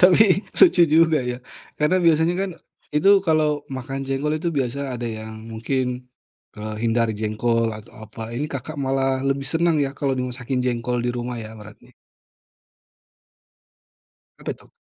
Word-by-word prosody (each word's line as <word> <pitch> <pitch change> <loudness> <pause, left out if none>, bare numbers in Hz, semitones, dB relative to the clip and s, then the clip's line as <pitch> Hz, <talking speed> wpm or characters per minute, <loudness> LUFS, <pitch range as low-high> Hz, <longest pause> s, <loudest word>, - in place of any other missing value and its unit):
Tapi, 190 +2 +5
lucu 260 - +7
juga, 160 0 +4
ya. 125 0 -3 0.4
Karena 150 +5 +3
biasanya 165 0 +3
kan, 195 -1 -1 0.4
itu 150 +7 +5 0.2
kalau 155 -2 +3 0.2
makan 135 +1 -4
jengkol 135 +3 -1
itu 170 - -1
biasa 135 0 -2
ada 120 - -5
yang 110 0 -6 0.2
mungkin, 125 +2 -2 0.5
eee, 110 0 -5
hindari 115 -1 +2
jengkol 115 +2 +1
atau 105 - -13 0.2
apa, 115 - -8
ini 145 +4 -1
Kakak 140 +3 -5
malah 135 0 +1
lebih 135 0 0
senang 165 +3 +2
ya 135 - -3
kalau 135 -2 0
dimasakin 125 0 -2
jengkol 125 0 -1
di 120 - +1
rumah 120 0 -4
ya 110 -1 -7
berarti. 105 0 -14 2.5
Apa - - -5
itu? - - -21
135 Hz, 145 wpm, -23 LUFS, 120-150 Hz, 2.5 s, lucu